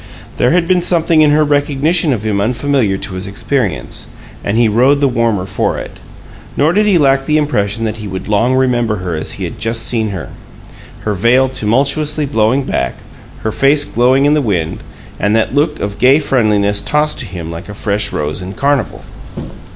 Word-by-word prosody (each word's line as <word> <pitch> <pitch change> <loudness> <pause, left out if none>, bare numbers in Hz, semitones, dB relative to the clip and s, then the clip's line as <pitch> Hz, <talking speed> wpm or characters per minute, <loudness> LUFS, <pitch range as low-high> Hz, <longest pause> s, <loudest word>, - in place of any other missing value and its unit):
There 125 - +2
had 170 +2 +2
been 180 -1 +2
something 165 -2 +2
in 150 - +5
her 150 +1 +3
recognition 145 +3 +1
of 110 -5 -2
him 100 -2 0
unfamiliar 120 -2 0
to 95 - -5
his 95 +1 -5
experience, 105 +1 -3 0.4
and 105 +2 -1
he 120 -1 +4
rode 125 +7 +3
the 140 - +3
warmer 115 -6 0
for - - -1
it. - - -8 0.6
Nor 155 +4 +3
did 210 +2 +2
he 195 -4 +4
lack 135 -3 +2
the 150 - +2
impression 115 -7 -1
that 110 0 -3
he 105 -1 -7
would 95 -1 -6
long 115 +5 +2
remember 120 -4 +1
her 90 -3 -4
as 80 - -3
he - - -6
had - - -6
just 115 0 -1
seen 110 -3 -1
her: 95 -3 -6 0.7
her 105 - -2
veil 125 +7 +3
tumultuously 140 +6 +1
blowing 130 0 +1
back, 65 - -2 0.5
her 110 - -1
face 145 +5 +2
glowing 130 +3 +2
in 145 - +4
the 150 - +2
wind 90 - -2 0.4
and 105 +2 +1
that 115 +2 +1
look 150 +2 0
of 100 0 -4
gay 130 +3 +5
friendliness 105 -8 +1
tossed 150 0 0
to - - -3
him 85 -3 -7
like 85 +4 -8
a 105 - -7
fresh 105 0 -2
rose 75 +2 -2
in 95 +1 -7
carnival. 140 -5 -1
120 Hz, 195 wpm, -14 LUFS, 105-145 Hz, 0.7 s, in